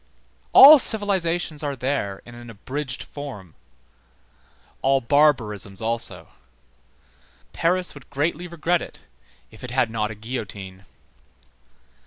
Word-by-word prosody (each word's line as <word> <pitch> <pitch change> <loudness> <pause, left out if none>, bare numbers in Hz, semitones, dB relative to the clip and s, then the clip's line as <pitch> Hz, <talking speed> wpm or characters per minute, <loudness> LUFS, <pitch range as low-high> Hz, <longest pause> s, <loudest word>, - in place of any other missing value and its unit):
All 290 +2 +10
civilizations 175 - +1
are 145 -2 -3
there 125 -7 -3
in 120 - -13
an 120 0 -12
abridged 130 +6 -6
form, 115 - -10 1.3
all 135 0 +2
barbarisms 115 -8 +1
also. 110 -7 -3 1.2
Paris 180 +2 0
would 140 -3 -15
greatly 160 +5 -2
regret 170 +1 -1
it - - -11 0.5
if 110 - -15
it 125 - -6
had 125 -2 0
not 105 -1 -2
a 110 - -8
guillotine. 105 -4 -8
130 Hz, 110 wpm, -22 LUFS, 110-155 Hz, 1.3 s, All